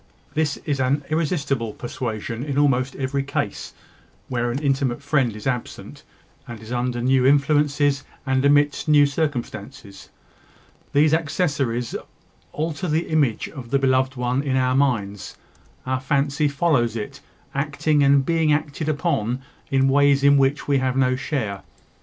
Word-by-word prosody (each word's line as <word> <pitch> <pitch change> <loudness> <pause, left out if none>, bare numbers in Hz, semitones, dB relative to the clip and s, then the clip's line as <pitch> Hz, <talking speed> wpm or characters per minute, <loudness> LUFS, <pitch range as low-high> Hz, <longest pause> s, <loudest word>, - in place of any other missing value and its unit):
This 150 -2 0
is 145 -3 -1
an 135 +3 +1
irresistible 140 - -1
persuasion 115 -1 -5
in 140 -1 -3
almost 135 -2 +2
every 135 +1 -1
case 140 +1 -4 0.5
where 120 -1 -1
an 120 - -2
intimate 135 -2 0
friend 140 -6 +1
is 105 - -9
absent, 125 -3 -4 0.5
and 120 -2 -8
is 110 +2 -11
under 120 -1 -1
new 130 0 +3
influences, 145 0 +2 0.2
and 130 -1 +1
amidst 145 +1 +3
new 150 -1 +6
circumstances. 125 -9 -4 0.8
These 150 +2 +4
accessories 140 - -1 0.6
alter 160 +3 -3
the 160 +2 -1
image 145 -8 +1
of 130 -6 -9
the 140 - +2
beloved 130 0 +1
one 125 +1 0
in 140 -2 -1
our 130 0 +2
minds; 110 -8 -1 0.5
our 130 0 -1
fancy 140 +2 +1
follows 140 -6 +1
it, 105 -2 -6 0.3
acting 145 +2 0
and 140 -1 +4
being 165 -1 +2
acted 150 +1 -1
upon 135 -6 -1 0.3
in 135 0 +3
ways 140 0 +4
in 140 0 +6
which 135 0 +1
we 140 -1 +3
have 130 0 -1
no 130 -1 +3
share. 130 -7 -3
140 Hz, 145 wpm, -22 LUFS, 125-145 Hz, 0.8 s, new